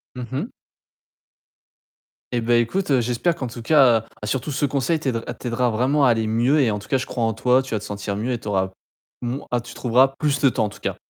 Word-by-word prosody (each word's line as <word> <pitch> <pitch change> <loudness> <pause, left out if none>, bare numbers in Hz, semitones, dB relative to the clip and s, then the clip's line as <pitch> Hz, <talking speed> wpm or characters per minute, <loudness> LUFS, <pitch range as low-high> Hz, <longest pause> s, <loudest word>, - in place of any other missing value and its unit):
Mmh 125 -1 -6
mh. 130 - -3 1.8
Et 120 - +1
bah, 120 +1 +2
écoute, 135 +2 +1
j'espère 125 +9 0
qu'en 130 -6 -4
tout 120 0 -8
cas 125 -3 +5
heu, - - -12 0.2
surtout 130 +6 -2
ce 140 +1 0
conseil 140 +4 0
t 135 - 0 0.3
t'aidera 125 0 0
vraiment 135 +6 +2
à - - +5
aller 110 -1 0
mieux 120 +7 +3
et 120 -5 +2
en 105 - -2
tout 100 - -13
cas, 135 - +2
je 130 - -3
crois 120 -3 -2
en 115 - 0
toi, 125 +4 +3
tu 130 -3 -7
vas 105 - 0
te - - -12
sentir 100 0 -4
mieux 115 +5 -2
et 120 - -2
tu - - -11
auras 95 -2 0 0.5
moin 125 +4 -4
ah, 120 - +2
tu 120 - -10
trouveras 130 +2 +3
plus 145 -2 0
de 135 0 +5
temps 110 - 0
en - - -3
tout - - -14
cas. - - -3
125 Hz, 245 wpm, -22 LUFS, 115-135 Hz, 1.8 s, cas